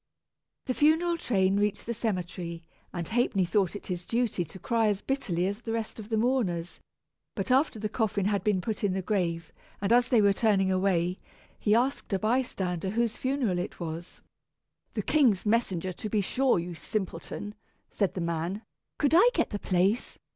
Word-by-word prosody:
The 255 - 0
funeral 320 +5 +3
train 195 - +1
reached 205 0 0
the 235 - -2
cemetery, 180 -6 -3 0.3
and 175 -2 -4
Ha'penny 225 -5 +1
thought 195 +1 +1
it 205 - -7
his 180 -1 -4
duty 230 -3 0
to 165 +3 -11
cry 225 +4 +1
as 205 -1 0
bitterly 190 -11 -1
as 200 +4 -2
the 225 -2 -4
rest 225 0 -3
of 215 0 -8
the 220 - +1
mourners; 215 -8 0 0.6
but - - -2
after 265 -1 +3
the 215 0 -2
coffin 210 -3 0
had 200 -2 +1
been 205 -3 +2
put 215 +2 -3
in 200 -2 +2
the 190 0 -2
grave, 170 -5 -1 0.3
and 200 +3 +2
as 245 0 +5
they 245 - +4
were 200 -1 +5
turning 195 -3 +2
away, 185 -1 +1 0.4
he 210 0 +3
asked 255 +2 0
a - - +3
bystander 195 -6 -1
whose 230 +2 0
funeral 255 -9 0
it 180 - -5
was. 170 0 -6 0.7
"The - - -2
king's 250 -12 +3
messenger, 190 -5 0
to 215 - -6
be 210 0 +1
sure, 255 +5 +2
you 175 +1 -3
simpleton," 190 +4 -4 0.4
said 195 -4 0
the 185 - -2
man. 170 +5 -2 0.3
"Could 290 0 +2
I 420 +8 +7
get - - +1
the 205 - -3
place?" 190 +6 0
205 Hz, 185 wpm, -28 LUFS, 180-235 Hz, 0.7 s, I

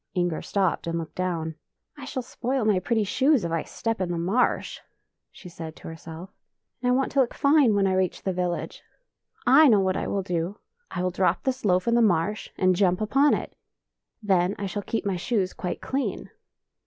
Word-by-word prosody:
Inger 175 -3 0
stopped 190 -4 0
and 165 0 -1
looked 165 -2 -6
down. 170 -3 -2 0.2
" - - -57
I 280 -3 -9
shall 260 -2 -4
spoil 250 +1 -2
my 210 -4 +3
pretty 220 +3 0
shoes 260 - +2
if 170 - -3
I 165 -1 0
step 225 +4 -3
in 180 - -1
the 170 - -2
marsh," 190 +9 0 0.5
she 185 - -13
said 165 -2 -8
to - - -11
herself, 165 +3 -9 0.3
" - - -55
and 250 0 +2
I - - +4
want 265 +1 0
to 275 - +1
look 245 - -1
fine 280 -6 +4
when 200 -1 +3
I 190 - +2
reach 185 -1 0
the 190 - -1
village. 180 -1 -3 0.6
I 310 0 +7
know 215 -6 +5
what 190 -1 +1
I - - -2
will 200 -1 -1
do! 180 +2 -2 0.3
I 180 - -3
will 185 - 0
drop 180 -1 +1
this 260 -1 -2
loaf 185 +1 +2
in 235 - +3
the 235 - +4
marsh 205 0 +1
and 185 -1 +3
jump 180 -1 +2
upon 270 +7 +3
it; - - -6 0.7
then 190 -1 +2
I 200 - -4
shall 205 +1 -3
keep 225 +2 -3
my 195 -2 0
shoes 195 -1 -1
quite 180 -2 -4
clean." 270 0 -3
190 Hz, 215 wpm, -25 LUFS, 175-235 Hz, 0.7 s, I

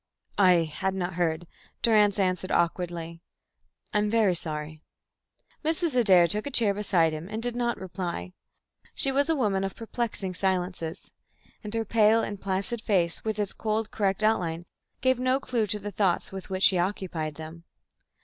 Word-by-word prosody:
"I 180 -4 +6
had 190 +5 -3
not 180 -1 -2
heard," 170 -1 -1 0.4
Durrance 210 -3 +4
answered 185 -1 0
awkwardly. 170 -1 -1 0.7
"I 210 - +3
am 210 0 +1
very 215 -4 +3
sorry." 155 -2 -5 0.8
Mrs. 320 -2 0
Adair 190 -8 +7
took 210 +8 -1
a - - -2
chair 225 -6 +3
beside 180 -6 +2
him 155 +4 -6
and 215 +1 -4
did 245 -1 -2
not 240 -1 0
reply. 175 - -5 0.6
She 270 - +1
was 280 +3 +1
a 325 - +3
woman 205 -8 +1
of 195 - -3
perplexing 225 -4 -3
silences; 180 -3 -2 0.5
and 210 - -6
her 225 0 -1
pale 220 +1 +4
and 205 -1 -5
placid 195 +4 -2
face, 180 -7 0
with 220 -1 -2
its 205 -2 -2
cold 220 0 -2
correct 200 0 0
outline, 175 -6 +1 0.4
gave 260 -1 +2
no 255 +1 +2
clue 235 -5 -1
to 210 - +1
the 205 0 -6
thoughts 190 -2 0
with 190 0 -8
which 190 0 -2
she 185 -2 +5
occupied 175 -5 -2
them. 160 +2 -10
195 Hz, 170 wpm, -27 LUFS, 175-220 Hz, 0.8 s, Adair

